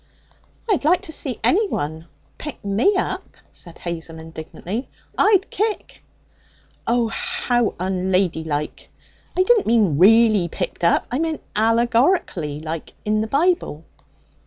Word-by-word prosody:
'I'd 405 -9 +1
like 345 +5 +3
to - - -7
see 265 -6 -3
anyone 170 - 0 0.3
pick 295 -8 -7
me 220 - +2
up!' - - -3
said 170 -1 -13
Hazel 165 -1 -6
indignantly. 160 - -6 0.3
'I'd 400 -2 +4
kick!' 430 0 -3 0.8
'Oh! 235 -1 +2
how 240 0 -1
unladylike! 180 -5 -1 0.5
I 370 - +5
didn't 445 +2 +3
mean 210 -10 +3
really 215 -1 +6
picked 170 - -5
up! 170 - +3
I 250 - 0
meant 320 -1 -2
allegorically 230 - +2
like 160 0 -6
in 215 0 +1
the 220 - -2
Bible.' 290 - +1
220 Hz, 120 wpm, -21 LUFS, -, 0.8 s, really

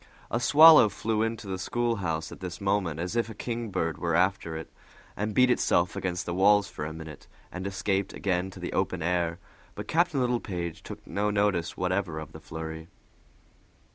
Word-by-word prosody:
A 120 - +1
swallow 150 -2 +8
flew 110 +1 -1
into 115 -1 -2
the 95 -1 -4
schoolhouse 95 -8 -1
at - - -10
this 90 -2 -6
moment 95 -5 0
as 90 +5 -3
if 115 -1 0
a 110 - -8
kingbird 100 - -3
were 85 -2 0
after 90 -2 +1
it, 80 - -9 0.4
and 105 +1 -3
beat 125 0 +5
itself 90 -6 +2
against 90 -2 -3
the 85 - -3
walls 100 +2 +4
for 75 - -6
a 75 - -4
minute, 80 -2 -10 0.2
and 95 +1 -5
escaped 95 0 -1
again 95 -1 -1
to - - -12
the - - -5
open - - -1
air; 85 -1 0 0.4
but - - -6
Captain 165 -3 +2
Littlepage 100 -9 -2
took - - -10
no 105 +1 -1
notice 100 -5 0
whatever 90 -2 -1
of 80 -2 -7
the - - -10
flurry. 80 0 -7
95 Hz, 180 wpm, -28 LUFS, 85-105 Hz, 0.4 s, swallow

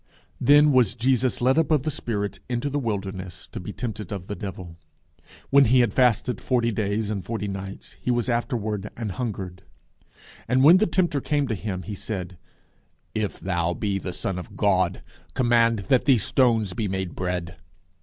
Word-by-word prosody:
_Then 145 +1 +6
was 120 -5 +3
Jesus 125 0 +1
led 130 +5 +4
up 160 - +1
of 150 -4 +3
the 155 - -1
Spirit 105 -8 -3
into 125 +3 -1
the 145 - 0
wilderness, 95 - -4
to - - -5
be 90 - -6
tempted 110 -4 -5
of 95 -3 -5
the 105 - -5
devil. 95 -5 -7
And 80 -1 -35 0.2
when 140 0 +7
he 125 +2 +5
had 115 -4 +1
fasted 125 -1 +2
forty 120 -2 +1
days 105 0 -1
and 100 -3 -3
forty 110 -3 -3
nights, 95 0 -7
he - - -3
was 120 0 +1
afterward 110 -4 -1
an 115 -3 -3
hungered. 95 -4 -5 0.9
And 130 +2 +3
when 165 +6 +9
the 215 - +2
tempter 170 -5 +1
came 145 -1 0
to - - 0
him, 95 -3 -4
he 105 - -6
said, 90 -4 -6 0.7
if 110 -2 -2
thou 85 -1 -1
be 100 -2 -1
the 90 - -5
Son 90 +1 -3
of 90 - -10
God, 95 -4 +1 0.3
command 115 -4 +3
that 125 -1 +4
these 130 -7 +4
stones 115 -7 +2
be 105 +2 -2
made 95 -2 -3
bread. 90 -1 -3
110 Hz, 185 wpm, -25 LUFS, 95-125 Hz, 0.9 s, when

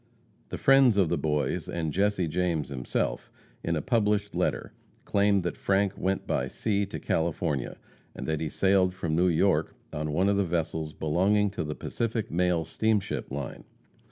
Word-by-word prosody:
The - - -4
friends 135 -5 +5
of 95 -5 +3
the 85 - +1
Boys, 75 -3 -1
and 80 -3 -2
Jesse 100 -2 +1
James 85 -2 -1
himself, 65 -3 -2 0.3
in 85 - 0
a 75 - -2
published 105 -3 +1
letter, - - -1 0.3
claim 100 -1 +3
that 90 -1 -3
Frank 100 0 +1
went 95 +1 -1
by 65 - -1
sea 100 - -1
to - - -6
California, 80 -4 -1 0.4
and - - -6
that 80 -1 -1
he 80 - -2
sailed 95 0 +2
from 80 -4 -2
New 90 +3 +3
York 85 -2 +2 0.2
on 75 0 -2
one 90 +6 +2
of 100 0 +2
the 100 - +3
vessels 80 -3 -2
belonging 95 +6 +2
to 90 -4 -3
the 75 -1 -4
Pacific 115 -1 -3
Mail 90 -1 +1
Steamship 105 +4 -1
Line. 70 -1 -5
90 Hz, 170 wpm, -28 LUFS, 80-100 Hz, 0.4 s, friends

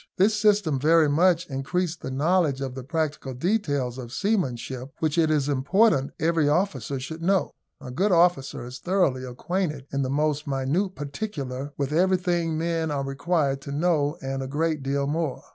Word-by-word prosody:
This 200 +4 +4
system 205 -9 +2
very 160 +2 +4
much 170 +3 +3
increased 165 +5 -2
the - - -5
knowledge 150 +1 +1
of 135 -2 -4
the 130 0 -7
practical 155 -3 -3
details 145 - -1
of 120 -2 -8
seamanship, 135 - -2
which 155 -2 0
it 165 -2 +3
is 150 -3 +1
important 145 +2 +2
every 160 -2 +2
officer 145 - 0
should 160 +5 -7
know. 190 +2 +1 0.3
A 125 - -8
good 190 +11 +1
officer 170 -8 +2
is 125 +1 -8
thoroughly 175 -7 +1
acquainted 150 +3 -3
in 140 - 0
the 130 - -1
most 150 +1 0
minute 140 +9 -1
particular 140 -4 -5
with 140 0 -2
everything 175 -2 +1
men 165 0 -1
are 140 -2 -1
required 140 0 0
to 140 - -7
know, 150 -1 +1
and 135 0 -3
a 135 - -4
great 155 +2 -1
deal 140 +1 -1
more. 150 -1 -2
150 Hz, 170 wpm, -25 LUFS, 135-175 Hz, 0.3 s, This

